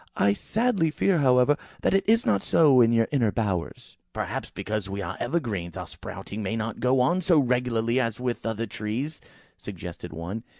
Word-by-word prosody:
I 100 +1 +4
sadly 210 - 0
fear, 175 +3 +1
however, 130 +1 +4 0.3
that - - +2
it 195 - +3
is 230 +2 +4
not 100 -2 +2
so 145 -6 +5
in 115 -1 +5
your 115 -1 +3
inner 120 -7 +2
bowers." 100 -7 -3 0.2
"Perhaps, - - -4
because 105 -2 -4
we 100 +1 -4
are 85 -4 -4
evergreens, 110 - -2
our - - -5
sprouting 105 +2 -8
may 105 +2 -2
not 115 0 -3
go 125 +2 +3
on 175 +8 +2
so 175 -2 +3
regularly 125 -2 +1
as 115 -3 -1
with 125 -1 -2
the - - -2
other 110 +1 -2
trees," 115 +9 -4 0.4
suggested 90 -3 -8
one. 85 +8 -5
115 Hz, 185 wpm, -26 LUFS, 105-140 Hz, 0.4 s, so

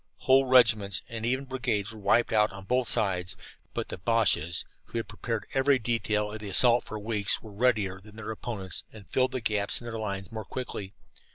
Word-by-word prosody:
Whole 135 0 +4
regiments 110 -6 +5
and 115 0 -3
even 130 +3 0
brigades 115 -6 -2
were 110 - -10
wiped 110 +4 +2
out 105 -1 +4
on 100 0 -9
both 125 +2 +1
sides, 90 -3 0 0.4
but - - -3
the - - -6
Boches, 90 -6 +2 0.2
who - - -6
had 115 - -2
prepared 115 0 -4
every 135 +1 +4
detail 110 -3 0
of 110 - -6
the 105 -1 -6
assault 120 +4 +5
for 110 - -6
weeks, 105 -1 -1
were 110 - -10
readier 100 -4 +1
than 105 +1 -15
their 110 0 -6
opponents 105 -4 -3
and 105 -3 -13
filled 130 0 +1
the 130 - -2
gaps 105 -2 0
in 120 - -11
their 115 -1 -5
lines 100 -3 -4
more 110 -1 -5
quickly. 105 -3 -6
110 Hz, 200 wpm, -28 LUFS, 100-120 Hz, 0.4 s, regiments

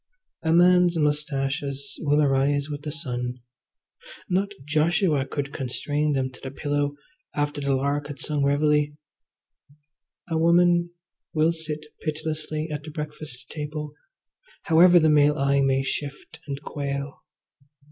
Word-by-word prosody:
A 160 - 0
man's 175 0 +5
moustaches 140 -2 -1
will 150 -1 +3
arise 140 +1 +2
with 145 0 -5
the 150 0 -5
sun; 125 -4 -3 0.9
not 195 +2 +1 0.2
Joshua 155 -1 +2
could 140 0 -4
constrain 145 +3 -1
them 130 -1 -1
to 125 - -14
the 135 - -5
pillow 145 +1 -1 0.4
after 145 0 -1
the 140 -1 +1
lark 140 +2 -1
had 145 -1 -7
sung 145 -1 -1
reveille. 150 +1 +3 1.4
A 165 -2 -1
woman 175 +1 +4 0.5
will 155 +1 +4
sit 155 -2 -4 0.2
pitilessly 155 0 -3
at 150 -1 -3
the 155 - -9
breakfast 150 -4 -6
table 150 -1 -5 0.7
however 175 +2 +6
the 160 - +3
male 150 -1 +4
eye 140 0 +2
may 135 0 +2
shift 145 +3 -5
and 140 -1 -4
quail. 140 -1 -4
150 Hz, 130 wpm, -25 LUFS, 140-155 Hz, 1.4 s, however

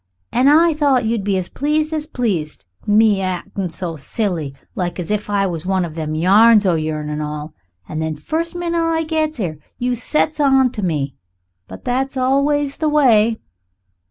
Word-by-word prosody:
An' 255 +2 +3
I 325 +3 +5
thought 280 -6 +2
you'd 225 -2 0
be 195 -1 0
as 185 -1 -2
pleased 305 +2 -1
as 305 -1 -2
pleased 195 - -3 0.2
me 210 -1 +4
actin' 185 0 -3
so 165 0 -5
silly, 160 - -3 0.2
like 180 0 -3
as 175 +2 -4
if 210 0 -2
I 200 -1 +1
was 175 -2 -4
one 190 -2 +1
of 160 - -8
them 155 -1 -4
yarns 205 +6 +5
o' 185 - +3
yourn 155 -1 -2
an' 150 0 -3
all. 150 +1 -5 0.3
And 155 - -4
then 160 -1 -2
first 325 - -3
minute 340 -1 -1
I 330 0 +1
gets 310 -3 -1
'ere, 160 -7 -3 0.2
you 250 0 -1
sets 305 +5 -1
on 270 -3 +4
to 215 - -5
me. 150 -7 -1 0.5
But 95 - -11
that's 265 +2 -1
always 280 +2 +1
the 310 -2 0
way." 235 -7 +3
215 Hz, 185 wpm, -19 LUFS, -, 0.5 s, I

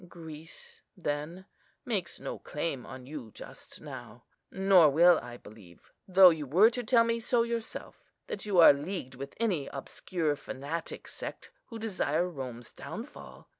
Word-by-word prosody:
Greece, 160 -2 -11 0.2
then, 165 +3 -4 0.4
makes 200 -8 -2
no - - -6
claim 150 -4 -4
on 130 -1 -9
you 135 -5 -8
just - - -10
now. - - -10 0.3
Nor 190 -4 +5
will 170 +4 +6
I 120 0 -9
believe, 105 -7 -16 0.2
though 185 -1 +8
you 155 -3 -4
were 195 - +6
to 245 +1 -4
tell 230 0 +5
me 230 0 0
so 235 0 +2
yourself, 235 -1 -5 0.2
that 200 - -5
you 205 -3 -1
are 165 -4 +10
leagued 145 -1 -5
with 140 +2 -8
any 185 -12 0
obscure, 150 +3 -3
fanatic 145 +4 -6
sect - - -8
who 230 - -8
desire 185 -6 0
Rome's 130 -7 -7
downfall. 70 -1 -9
165 Hz, 150 wpm, -30 LUFS, 140-195 Hz, 0.4 s, are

